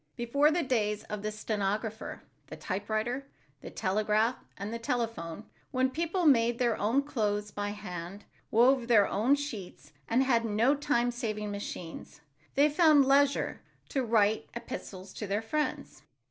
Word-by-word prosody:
Before 280 +5 +3
the 335 +2 +1
days 210 -5 0
of 210 -1 -3
the 215 +1 -2
stenographer, 215 +1 -3 0.2
the - - -8
typewriter, 215 +7 -2 0.3
the - - -8
telegraph 215 +4 +1 0.2
and 205 +3 -5
telephone, 230 - -2 0.3
when 260 0 +1
people 335 +4 -1
made 240 -5 +4
their 235 -3 +2
own 235 +7 +1
clothes 210 -6 -1
by 205 0 -3
hand, 195 -1 -7 0.2
wove 245 +2 +4
their 215 -5 +5
own 230 +8 +3
sheets 230 - -7
and 250 +3 +3
had 240 -3 +2
no 225 +5 +3
time 280 -4 +1
saving 215 -4 -3
machines, 175 -6 -7 0.3
they 285 +2 +5
found 300 -2 +5
leisure 275 +1 +2 0.3
to 270 - 0
write 220 -2 +2
epistles 190 -5 -7
to 210 - -5
their 205 +3 -1
friends. 300 +7 -3
225 Hz, 145 wpm, -30 LUFS, 205-265 Hz, 0.3 s, their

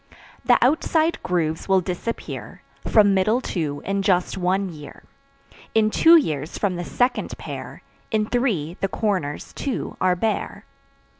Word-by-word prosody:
The - - +5
outside 320 +4 +1
grooves 165 -1 -1
will 190 -1 +5
disappear 185 +6 -5 0.2
From 205 -2 +5
middle 215 +5 +2
two 155 - -3
in 195 0 0
just 185 -2 +1
one 190 +1 0
year. 150 -3 -11 0.7
In 215 -1 +3
two 330 +8 +6
years, 155 - -2
from 195 -3 0
the 175 - -4
second 245 +8 -1
pair; - - -8 0.3
In 215 -1 +1
three, 210 - -1
the 195 - +2
corners, 185 -8 -2
too, 275 -3 -4
are 185 -1 +3
bare. 220 +4 -2
195 Hz, 140 wpm, -23 LUFS, 175-225 Hz, 0.7 s, two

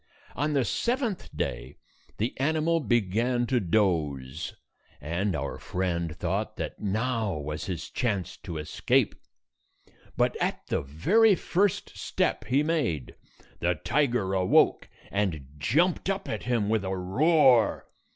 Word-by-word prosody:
On 150 +1 0
the 135 -4 +2
seventh 240 - -1
day, - - -3 0.4
the 115 +4 -1
animal 160 +3 +2
began 120 - +1
to 125 0 +1
doze, 80 - 0 0.4
and 85 +6 -1
our - - -4
friend 85 -3 -2
thought - - -2
that - - -5
now 110 -2 -1
was 75 +1 -4
his 90 -4 -4
chance 100 -7 -2
to 85 - -7
escape. 75 0 +1 1.0
But - - +2
at - - -2
the - - +1
very 190 - +4
first 190 +2 0
step - - -1
he 135 +5 +2
made, 150 - -1 0.5
the 85 +1 +1
tiger 125 - 0
awoke 95 -1 +3 0.2
and 95 -9 -1
jumped 170 - +2
up 195 0 -2
at 110 - -3
him 120 -4 +1
with 110 -1 +1
a 95 0 -2
roar. 125 - +4
105 Hz, 130 wpm, -27 LUFS, 85-145 Hz, 1.0 s, very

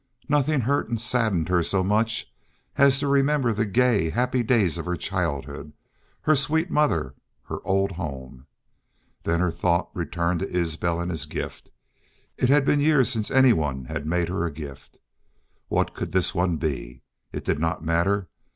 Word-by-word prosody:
Nothing 150 -1 +2
hurt 140 +5 0
and 115 -2 -1
saddened 110 -7 +1
her 90 -1 +3
so 95 +3 0
much 110 +3 0 0.4
as 140 -1 +5
to 140 +1 -1
remember 140 -3 +2
the 105 +1 -1
gay, 110 -6 +2
happy 125 +6 0
days 105 -8 +2
of - - -5
her 90 - 0
childhood, 70 -1 -3 0.5
her 155 - +3
sweet 160 +5 +2
mother, 80 - +1 0.3
her, - - -6
old 95 +1 +1
home. 70 -7 -7 0.7
Then 85 +1 0
her 90 -2 +1
thought 85 +1 0
returned 85 0 -1
to 95 - -3
Isbel 85 -1 -1
and 85 +1 -2
his 75 -3 -4
gift. - - -6 0.7
It 125 - +1
had 145 0 +4
been 145 - +3
years 145 -5 +4
since 110 -2 0
anyone 80 - +3
had 75 - -5
made 85 +1 +1
her 90 -2 -1
a 85 - -1
gift. 70 -3 -10 0.7
What - - 0
could - - -5
this 95 -3 +2
one 90 -1 +1
be? 65 -5 -4 0.3
It - - -6
did - - 0
not 80 0 -2
matter. 90 +4 +1
95 Hz, 170 wpm, -25 LUFS, 80-125 Hz, 0.7 s, as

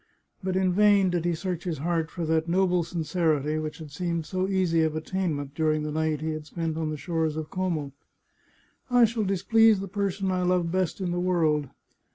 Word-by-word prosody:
But 185 0 -1
in 185 -1 +2
vain 200 -1 +4
did 175 -1 -1
he 175 -1 +1
search 175 0 -4
his 170 -3 -2
heart 165 +2 -1
for 170 -2 -4
that 160 +1 0
noble 180 -1 +2
sincerity 160 -2 0
which 155 0 -5
had 155 -3 -10
seemed 170 +1 -2
so 185 +2 -1
easy 185 -4 +2
of 160 -1 +1
attainment 155 -4 -2
during 155 0 +1
the 150 - -3
night 155 -1 -1
he 160 0 -2
had 155 -1 -6
spent 165 -1 -3
on 160 -1 -2
the 155 - -3
shores 160 -1 -1
of 155 -1 -5
Como. 170 -7 -2 0.5
" - - -37
I 240 - +8
shall 225 0 -1
displease 220 +3 +4
the 195 - -5
person 195 -1 -1
I 185 0 0
love 180 -2 +1
best 185 +1 -1
in 180 -2 -1
the 175 - -1
world. 160 -6 +1
170 Hz, 205 wpm, -26 LUFS, 155-185 Hz, 0.5 s, I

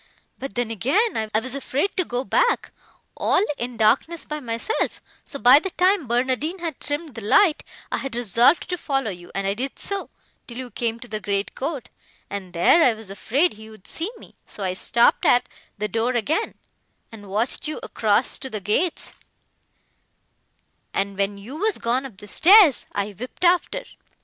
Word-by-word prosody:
But 270 - -6
then, 240 -2 -1
again, 315 - +1 0.2
I 215 - +2
was 255 +3 -6
afraid 280 +6 -1
to 370 - +2
go 250 -5 -3
back, - - +1 0.4
all 415 - +2
in 240 0 -4
darkness, 270 +10 +2
by 300 0 -4
myself; 235 - -2 0.2
so 280 - -6
by 260 +1 +7
the 385 - -4
time 365 -4 +2
Barnardine 260 +8 0
had 335 -5 -5
trimmed 295 0 -3
the 225 - -7
light, 330 - +4 0.3
I - - 0
had 270 -3 -5
resolved 240 - +3
to 360 - -2
follow 270 -8 -1
you, 175 -1 -11
and 195 0 -1
I 195 - +1
did 260 +6 -4
so, 400 -1 -3 0.4
till 235 - -9
you 255 -1 -6
came 230 -1 -2
to 245 - -9
the 215 -2 -4
great 200 0 -2
court, 275 -2 -4 0.4
and 195 -3 -5
there 175 - +5
I 240 - +4
was 215 -3 -11
afraid 275 - +1
he 220 +1 -13
would 215 -4 -16
see 335 +5 -3
me; - - -15
so 205 - -7
I 185 -1 -1
stopped 235 +5 +3
at 245 +1 +4 0.3
the 210 +1 -2
door 230 +4 0
again, 305 - 0 0.6
and 205 -3 -11
watched 220 +9 0
you 305 - -4
across 220 +2 +1
to 265 - -6
the 215 - -4
gates, 215 - -1 1.8
and, 195 0 -1
when 200 +1 -1
you 235 +9 -9
were 425 +5 +1
gone 250 +3 0
up 220 -8 -17
the 205 - -11
stairs, 345 - +6
I 200 +1 -2
whipt 250 - -8
after. 360 +8 +2
245 Hz, 185 wpm, -23 LUFS, 215-310 Hz, 1.8 s, by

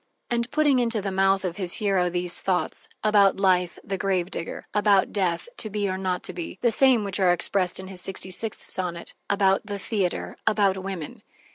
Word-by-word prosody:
And 235 0 0
putting 290 -3 +3
into 230 -2 +1
the 195 -1 -3
mouth 195 0 +2
of 180 0 -3
his 185 -3 -2
hero 195 -5 +1
these 175 0 0
thoughts: 180 -4 -2
about 205 -3 +4
life 180 -2 +2
(the 195 -1 -4
grave 190 -2 0
digger), 165 - -6
about 205 -2 +3
death 185 - -1
(To 215 - -1
be 205 0 -1
or 185 - -2
not 185 -2 -2
to - - -3
be) 175 +1 -6
the 235 - +4
same 255 -1 +4
which 200 -1 -3
are 185 -2 +4
expressed 180 +1 +1
in 190 - -7
his 185 -1 -3
sixty 190 0 -2
sixth 215 +4 -3
sonnet 175 -2 0 0.2
about 195 0 +2
the 205 -1 -4
theater, 195 -2 -2
about 205 -3 +3
women. 190 -5 -6
195 Hz, 200 wpm, -25 LUFS, 180-205 Hz, 0.2 s, about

